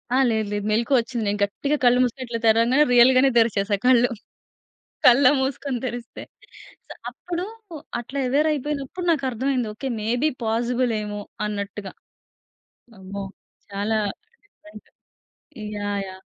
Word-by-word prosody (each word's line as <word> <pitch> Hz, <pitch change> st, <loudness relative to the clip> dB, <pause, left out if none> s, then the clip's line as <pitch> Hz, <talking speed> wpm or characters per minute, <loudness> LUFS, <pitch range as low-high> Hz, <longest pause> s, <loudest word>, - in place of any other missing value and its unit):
ఆ! -, -, +4 dB
లేదు. 220 Hz, -2 st, 0 dB
లేదు. 205 Hz, -1 st, -2 dB
మెలుకువ 235 Hz, +5 st, +2 dB
వచ్చింది. 230 Hz, -1 st, -3 dB
నేను 205 Hz, +1 st, -1 dB
గట్టిగా 280 Hz, +9 st, -1 dB
కళ్ళు 245 Hz, 0 st, +5 dB
మూసుకొని 255 Hz, +1 st, -2 dB
ఇట్ల 230 Hz, -1 st, -3 dB
తెరవంగానే 230 Hz, +6 st, +4 dB
రియల్ 245 Hz, +2 st, +7 dB
గానే 270 Hz, +1 st, +5 dB
తెరిచేసా 210 Hz, -3 st, +2 dB
కళ్ళు. 245 Hz, -1 st, +5 dB, 1.0 s
కళ్ళు 250 Hz, +3 st, +7 dB
మూసుకొని 265 Hz, -1 st, -2 dB
తెరిస్తే 240 Hz, -1 st, -6 dB, 0.7 s
స్ -, -, -8 dB
అప్పుడు 350 Hz, 0 st, -5 dB, 0.6 s
అట్లా 270 Hz, +4 st, -5 dB
ఎవేర్ 290 Hz, +5 st, +2 dB
అయిపోయినప్పుడు 295 Hz, +4 st, -3 dB
నాకర్థమైంది. 260 Hz, -3 st, 0 dB
ఓకే. 270 Hz, +5 st, -6 dB
మే 215 Hz, -, -4 dB, 0.2 s
బి 310 Hz, -, +4 dB, 0.2 s
పాజిబుల్ 240 Hz, +2 st, 0 dB
ఏమో 205 Hz, 0 st, -5 dB, 0.3 s
అన్నట్టుగా. 200 Hz, -1 st, -5 dB, 1.1 s
అమ్మో! 195 Hz, +1 st, -6 dB, 0.5 s
చాలా 205 Hz, +2 st, -1 dB, 0.5 s
నిజంగా 315 Hz, -, -17 dB, 0.9 s
యాహ్! 205 Hz, 0 st, -2 dB
యాహ్! 190 Hz, 0 st, -13 dB
240 Hz, 130 wpm, -23 LUFS, 210-270 Hz, 1.1 s, రియల్